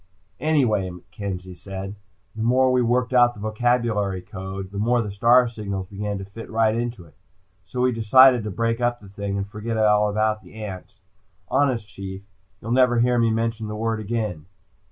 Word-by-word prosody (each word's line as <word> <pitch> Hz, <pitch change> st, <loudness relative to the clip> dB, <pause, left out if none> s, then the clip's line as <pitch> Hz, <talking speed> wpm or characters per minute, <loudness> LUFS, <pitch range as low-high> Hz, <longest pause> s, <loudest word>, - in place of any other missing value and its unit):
"Anyway," 120 Hz, -12 st, +2 dB, 0.2 s
Kenzie 95 Hz, -2 st, -5 dB
said. 95 Hz, +2 st, -7 dB, 0.4 s
"The 110 Hz, -, -5 dB
more 130 Hz, +3 st, +3 dB
we 125 Hz, -1 st, +3 dB
worked 125 Hz, +2 st, +1 dB
out 120 Hz, -1 st, +5 dB
the -, -, -12 dB
vocabulary 110 Hz, -3 st, 0 dB
code, 95 Hz, 0 st, -7 dB
the 100 Hz, -, -5 dB
more 120 Hz, +3 st, +2 dB
the 105 Hz, -3 st, -2 dB
star 120 Hz, +5 st, +5 dB
signals 100 Hz, -4 st, -5 dB
began 100 Hz, +1 st, -4 dB
to 95 Hz, -, -6 dB
fit 105 Hz, +4 st, -10 dB
right 110 Hz, -1 st, +2 dB
into 115 Hz, -5 st, -3 dB
it. 80 Hz, -, -20 dB, 0.5 s
So 125 Hz, -, -3 dB
we 125 Hz, 0 st, +3 dB
decided 125 Hz, +2 st, +6 dB
to 105 Hz, -, -3 dB
break 115 Hz, +4 st, -1 dB
up 120 Hz, 0 st, +1 dB
the 100 Hz, -, -14 dB
thing, 100 Hz, 0 st, -4 dB
and 100 Hz, 0 st, -3 dB
forget 110 Hz, +2 st, -4 dB
all 105 Hz, -1 st, +4 dB
about 110 Hz, 0 st, 0 dB
ants. 100 Hz, -2 st, -8 dB, 0.5 s
Honest 130 Hz, -7 st, +1 dB
Chief, 95 Hz, -1 st, -8 dB, 0.4 s
you'll 115 Hz, -, -4 dB
never 125 Hz, -1 st, +4 dB
hear 120 Hz, 0 st, +3 dB
me 115 Hz, -1 st, +3 dB
mention 115 Hz, 0 st, -1 dB
the 105 Hz, -, -5 dB
word 115 Hz, 0 st, -1 dB
again." 105 Hz, -7 st, -3 dB
110 Hz, 180 wpm, -23 LUFS, 100-120 Hz, 0.5 s, decided